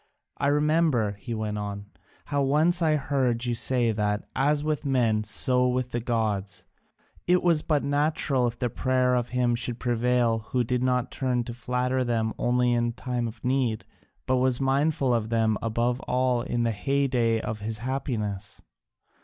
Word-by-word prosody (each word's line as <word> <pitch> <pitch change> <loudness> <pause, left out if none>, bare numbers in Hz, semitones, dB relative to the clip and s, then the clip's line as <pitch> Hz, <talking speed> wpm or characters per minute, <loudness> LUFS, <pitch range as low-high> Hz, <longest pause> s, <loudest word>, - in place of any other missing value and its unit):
I - - +1
remember," 150 -6 +2
he 120 -1 -5
went 105 -1 -3
on, 100 0 -6 0.3
"how 145 -1 -1
once 155 +6 +2
I 155 -2 +3
heard 130 -5 0
you 120 - 0
say 120 0 +1
that, 105 -1 -1
as 145 +2 +2
with 150 -2 -1
men, 120 -6 +1
so 125 +4 +3
with 125 0 -1
the 120 - -1
gods, 110 -4 -2 0.6
it 180 +1 +3
was 170 -3 +3
but 150 -3 0
natural 145 -3 +1
if 115 0 -5
the 120 -1 -2
prayer 130 0 +1
of 125 -1 0
him 125 -1 +1
should 120 0 -3
prevail 120 -1 +1
who 120 +3 -1
did 125 +1 -1
not 125 -1 0
turn 125 -3 -1
to 120 - -7
flatter 125 +2 -1
them 115 -2 -1
only 125 0 +2
in 120 0 0
time 125 -1 -3
of 110 +1 -9
need, 125 -4 0 0.4
but 130 - +1
was 125 -1 +2
mindful 135 0 +1
of 115 -2 -1
them 110 -1 +2
above 120 +2 0
all 125 -1 +1
in 120 0 -1
the 115 - +1
heyday 125 -1 +1
of 110 -1 -4
his 110 +1 -4
happiness. 110 -5 -4
125 Hz, 170 wpm, -26 LUFS, 115-135 Hz, 0.6 s, I